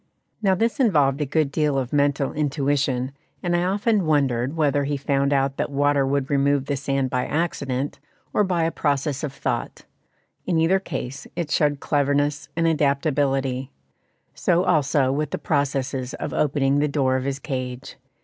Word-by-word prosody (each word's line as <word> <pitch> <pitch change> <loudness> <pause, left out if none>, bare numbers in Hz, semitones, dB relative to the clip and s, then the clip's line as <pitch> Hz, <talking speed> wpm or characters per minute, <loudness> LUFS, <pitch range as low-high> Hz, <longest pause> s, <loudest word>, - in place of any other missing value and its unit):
Now 195 -3 +3
this 230 +8 0
involved 150 - +3
a 145 - 0
good 145 0 +1
deal 150 -1 +1
of 130 -1 -2
mental 140 -1 +1
intuition, 140 -3 0 0.3
and 175 -1 +1
I 175 - +2
often 200 0 +1
wondered 135 -1 +1
whether 145 -2 +2
he 145 0 -1
found 140 0 0
out 135 -1 +1
that - - -1
water 145 -1 +2
would 140 +1 -1
remove 140 0 +2
the 145 - -1
sand 135 -1 -1
by 125 0 0
accident, 140 -4 -2 0.3
or 210 - +3
by 180 -4 0
a 165 - +1
process 145 -2 -1
of 150 - -2
thought; 140 - -4 0.6
in 175 -3 +1
either 165 +4 +3
case, 135 -7 -6
it 165 -3 -3
showed 145 -2 +1
cleverness 145 0 0
and 165 0 +1
adaptability. 140 -4 +1 0.6
So 175 0 +2
also 145 -5 +2
with 150 +1 -1
the - - -3
processes 135 -3 -1
of 145 - -5
opening 140 -1 +2
the 150 - +2
door 135 -3 +1
of 130 0 -1
his 140 -1 -1
cage. 130 -2 -5
145 Hz, 170 wpm, -23 LUFS, 135-155 Hz, 0.6 s, Now